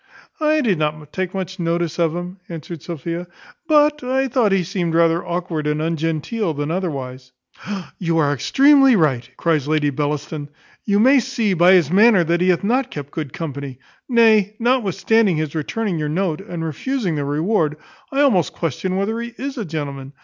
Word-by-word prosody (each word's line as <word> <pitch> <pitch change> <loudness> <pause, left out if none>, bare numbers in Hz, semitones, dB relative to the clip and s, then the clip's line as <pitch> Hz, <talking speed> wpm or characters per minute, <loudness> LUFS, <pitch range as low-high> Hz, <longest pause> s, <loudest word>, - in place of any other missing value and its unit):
"I 310 0 +2
did 200 - +1
not 150 -1 -3
take 185 -1 -2
much 190 0 -5
notice 170 -1 -1
of 165 -1 +1
him," 180 +2 -6
answered 165 -1 -7
Sophia, 170 +2 -5 0.4
"but 300 -2 +3
I 265 +2 0
thought 235 -4 +2
he 195 -2 +2
seemed 170 -1 -2
rather 165 0 +3
awkward, 170 -3 -3
and 150 0 0
ungenteel 165 +4 -2
than 145 +2 -3
otherwise." 135 -8 -4 0.7
"You 165 -2 0
are 145 -3 +2
extremely 270 - +5
right," 130 - +1
cries 155 -4 0
Lady 150 -1 +1
Bellaston: 145 +1 -3 0.4
"you 200 0 +2
may 265 +5 +6
see, 235 -5 -1
by 180 +1 +5
his 170 -5 +3
manner, 205 -1 +5
that 170 +1 0
he 185 - +3
hath 180 0 +2
not 255 +5 +1
kept 145 - -7
good 150 -5 -5
company. 140 -4 -6 0.3
Nay, 220 -4 +4
notwithstanding 225 -5 +2
his 155 -2 -2
returning 175 +3 -2
your 150 -1 -2
note, 170 0 -1
and 175 -5 -6
refusing 195 - -2
the 145 -2 -2
reward, 155 +2 0 0.3
I 275 +1 +1
almost 195 - +2
question 175 +4 -3
whether 215 +4 -1
he 235 0 -7
is 275 +1 -4
a 230 -5 -4
gentleman. 140 -4 -5
170 Hz, 175 wpm, -20 LUFS, 155-220 Hz, 0.7 s, may